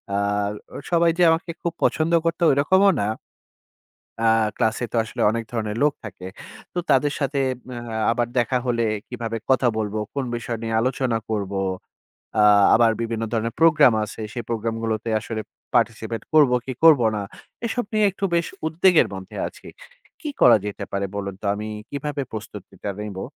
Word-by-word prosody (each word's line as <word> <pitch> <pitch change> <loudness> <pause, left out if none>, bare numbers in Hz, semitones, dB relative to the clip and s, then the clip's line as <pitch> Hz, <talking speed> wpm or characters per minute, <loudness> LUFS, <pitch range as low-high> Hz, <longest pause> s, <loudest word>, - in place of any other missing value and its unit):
আ - - +1 0.6
অ - - -4
সবাই 170 -1 +4
যে - - +6
আমাকে 165 +1 -1
খুব 170 - -2
পছন্দ 160 +1 +2
করতো 165 +1 0
ঐরকমও 190 +8 +4
না। 100 - 0 1.2
আ - - +5 0.3
ক্লাসে 115 0 0
তো - - -5
আসলে 110 - -6
অনেক 115 0 -2
ধরনের 110 -2 -2
লোক 150 -1 +3
থাকে। 95 -4 -8 0.5
তো 180 - -1
তাদের 140 +1 +3
সাথে 140 -1 -1 0.3
ম্যা 125 -1 -6 0.3
আবার 120 0 0
দেখা 120 +2 +1
হলে 115 -2 +1 0.2
কিভাবে 115 -2 -4
কথা 130 -1 +4
বলবো? 110 -1 -2
কোন 140 -2 -2
বিষয় 120 0 -4
নিয়ে 115 0 -1
আলোচনা 125 -1 0
করবো? 100 -2 -2 0.8
আ - - +6 0.3
আবার 115 -1 +5
বিভিন্ন 115 -1 -2
ধরনের 115 0 -1
প্রোগ্রাম 150 -6 +6
আছে। 110 - -9
সেই 120 - -4
প্রোগ্রামগুলোতে 115 0 -2
আসলে 110 0 -5 0.3
পার্টিসিপেট 115 -1 0
করবো 145 -5 +6
কি 130 - -4
করবো 150 -8 +7
না? 105 - -2 0.4
এসব 245 +1 -1
নিয়ে 215 -1 +3
একটু 195 +1 -3
বেশ 170 0 +2 0.2
উদ্বেগের 170 +2 +4
মধ্যে 95 -1 -9
আছি। - - -13 0.5
কি 305 - -4
করা 120 - +8
যেতে 105 - -5
পারে 100 0 -1
বলুন 100 -1 -4
তো? - - -7
আমি 105 +1 -5 0.2
কীভাবে 145 0 -3
প্রস্তুতিটা 105 -1 -7
নেবো? 105 -2 -5
120 Hz, 165 wpm, -23 LUFS, 110-150 Hz, 1.2 s, করা